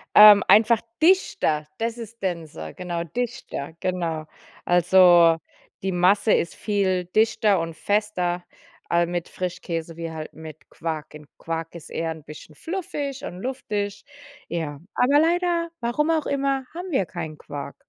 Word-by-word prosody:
Ähm, 210 -1 +10
einfach 225 +1 +6 0.2
dichter. 235 - +3
Das 230 +1 -2
ist 230 -1 -10
denser, 160 - -4
genau, 175 -2 -4
dichter, 170 -7 -5
genau. 170 -4 -2 0.4
Also, 175 -1 +6 0.5
die 190 - 0
Masse 185 +4 +3
ist 170 - 0
viel 190 -4 0
dichter 210 0 +2
und 165 -1 -4
fester 180 -2 -1 0.4
al 170 0 +3
mit 175 0 -3
Frischkäse 170 -2 -5
wie 165 -1 -4
halt 155 -1 -7
mit 155 -3 -11
Quark. 160 -2 -5
Und 150 -1 -12
Quark 165 0 -5
ist 170 - -10
eher 165 0 -2
'n 160 -2 -9
bisschen 150 +1 -12
fluffig 295 - -4
und 180 - -7
luftig. 210 -6 -3 0.4
Ja, 155 -4 -4 0.2
aber 280 +4 +4
leider- 340 +1 +1
warum 270 +7 0
auch 320 -2 +1
immer- 275 -1 0
haben 360 +2 -6
wir 230 - +2
keinen 160 -3 -6
Quark. 140 -1 -7
180 Hz, 145 wpm, -24 LUFS, 165-230 Hz, 0.5 s, Ähm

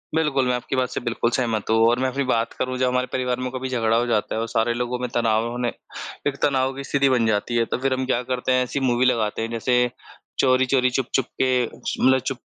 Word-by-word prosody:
बिल्कुल, 145 -5 +1
मैं 125 - +2
आपकी 125 - -4
बात 130 -1 0
से - - -3
बिल्कुल 120 0 -1
सहमत 115 -5 -1
हूँ 110 - +3
और 120 +2 +2
मैं 130 0 +1
अपनी 140 +2 -2
बात 115 -3 0
करूँ, 130 0 -1
जब 130 0 +1
हमारे 125 0 0
परिवार 125 -1 -1
में 130 0 -2
कभी 130 0 -4
झगड़ा 115 -3 +1
हो 120 - +1
जाता 110 -2 0
है 110 - -1
और 115 - -2
सारे 115 +1 +1
लोगों 125 +1 -2
में 125 - -2
तनाव 115 -1 +1
होने 120 -1 -2 0.6
एक 140 -1 -2
तनाव 135 -1 +2
की 140 - -6
स्थिति 140 0 +2
बन 125 -3 +2
जाती 110 +2 0
है, 115 -1 +2
तो - - -2
फिर 135 0 0
हम 130 0 -1
क्या 125 -1 0
करते 125 +1 0
हैं, 130 0 +3
ऐसी 135 +3 -3
मूवी 125 -1 +2
लगाते 110 -4 +1
हैं 115 - -2
जैसे 125 +1 +1 0.5
चोरी-चोरी 130 0 +3
चुप-चुप 130 0 -1 0.2
के 130 -1 +3 0.4
मतलब 130 +1 +5
चुप 130 0 -4
125 Hz, 245 wpm, -23 LUFS, 120-130 Hz, 0.6 s, मतलब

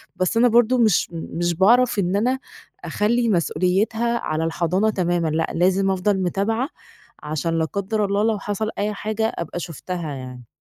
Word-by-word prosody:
بس 185 +5 0
أنا 240 +2 +5
برضه 240 +1 +4
مش 220 -7 +3
مش 170 +1 -2
باعرف 230 +5 +4
إن 185 0 0
أنا 250 +6 +1 0.5
أخلّي 230 +3 +1
مسؤوليتها 210 +6 +1
على 155 +1 -2
الحضانة 175 +5 +1
تمامًا، 175 -4 0
لأ، 160 +1 0
لازم 190 +3 +2
أفضل 190 +1 0
متابعة، 225 - -1 0.5
عشان 155 +2 -2
لا 160 - +1
قدّر 200 +5 -1
الله 200 +1 0
لو 220 -2 +1
حصل 205 +2 -3
أي 210 +1 -1
حاجة، 215 +2 -2
أبقى 170 +1 -4
شُفتها 170 0 -5
يعني. 125 -2 -9
195 Hz, 160 wpm, -22 LUFS, 170-220 Hz, 0.5 s, أنا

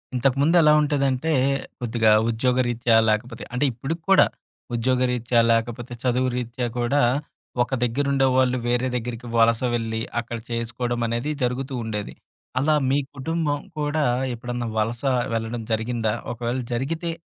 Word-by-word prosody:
ఇంతకుముందు 140 +6 +2
ఎలా 150 -1 +6
ఉంటేదంటే 140 0 +1 0.5
కొద్దిగా 115 -2 +2 0.2
ఉద్యోగరీత్యా 120 0 +1
లేకపోతే 115 +2 -1
అంటే 125 +4 +1
ఇప్పుడుకి 140 +8 -4
కూడా 195 - +7 0.5
ఉద్యోగరీత్యా, 125 0 +1
లేకపోతే 120 +1 -1
చదువు 130 0 +2
రీత్యా 120 0 -3
కూడా 120 +4 +2 0.6
ఒక 120 - -9
దగ్గరుండేవాాళ్ళు 130 0 +2
వేరే 125 +1 +1
దగ్గరికి 120 0 -4
వలస 115 0 +4
వెళ్ళి, 115 -1 -1 0.2
అక్కడ 120 0 -5
చేసుకోవడమనేది 120 +2 -2
జరుగుతూ 125 +2 -2
ఉండేది. 105 -2 -4 0.5
అలా 150 +3 +3
మీ 140 +2 +3 0.2
కుటుంబం 150 +1 -1 0.2
కూడా 150 +1 0 0.3
ఎప్పుడన్నా 120 0 -4
వలస 115 +2 -1 0.3
వెళ్ళడం 115 +1 -2
జరిగిందా? 110 -1 0 0.2
ఒకవేళ 120 +1 -2 0.2
జరిగితే 160 +8 -2
125 Hz, 120 wpm, -24 LUFS, 115-135 Hz, 0.6 s, కూడా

